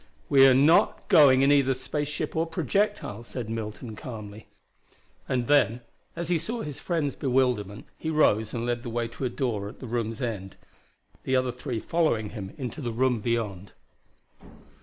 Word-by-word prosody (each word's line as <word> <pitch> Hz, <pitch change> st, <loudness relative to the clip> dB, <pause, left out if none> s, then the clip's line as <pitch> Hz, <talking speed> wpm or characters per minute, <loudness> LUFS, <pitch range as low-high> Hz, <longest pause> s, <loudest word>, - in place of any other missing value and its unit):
"We 135 Hz, -1 st, +7 dB
are 130 Hz, -, +6 dB
not 150 Hz, +6 st, +4 dB
going 135 Hz, -3 st, +7 dB
in 140 Hz, -, +5 dB
either 135 Hz, -2 st, +3 dB
space 145 Hz, +3 st, -3 dB
ship 150 Hz, +1 st, -4 dB
or 165 Hz, +1 st, +1 dB
projectile," 200 Hz, -, -1 dB
said 120 Hz, -1 st, -6 dB
Milton 110 Hz, 0 st, -5 dB
calmly. 105 Hz, -3 st, -9 dB, 0.8 s
And 125 Hz, -2 st, 0 dB
then 125 Hz, -4 st, +3 dB, 0.3 s
as 170 Hz, -1 st, -4 dB
he 175 Hz, -2 st, +2 dB
saw 225 Hz, +8 st, -3 dB
his 145 Hz, -3 st, -6 dB
friend's 160 Hz, -6 st, -1 dB
bewilderment 125 Hz, -7 st, 0 dB
he 160 Hz, -, -3 dB
rose 110 Hz, -9 st, +2 dB
and 115 Hz, 0 st, -3 dB
led 120 Hz, 0 st, -1 dB
the 120 Hz, -, -6 dB
way 115 Hz, 0 st, -2 dB
to 125 Hz, +3 st, -5 dB
a -, -, 0 dB
door 115 Hz, -6 st, -2 dB
at -, -, -13 dB
the -, -, -8 dB
room's 115 Hz, 0 st, -3 dB
end, 105 Hz, -7 st, -4 dB, 0.7 s
the 130 Hz, -, 0 dB
other 130 Hz, -1 st, +1 dB
three 125 Hz, -1 st, -4 dB
following 120 Hz, -9 st, 0 dB
him 100 Hz, -4 st, -7 dB
into 135 Hz, +3 st, -5 dB
the 120 Hz, -3 st, -3 dB
room 125 Hz, +1 st, +1 dB
beyond. 105 Hz, -4 st, -3 dB
125 Hz, 175 wpm, -27 LUFS, 110-145 Hz, 0.8 s, We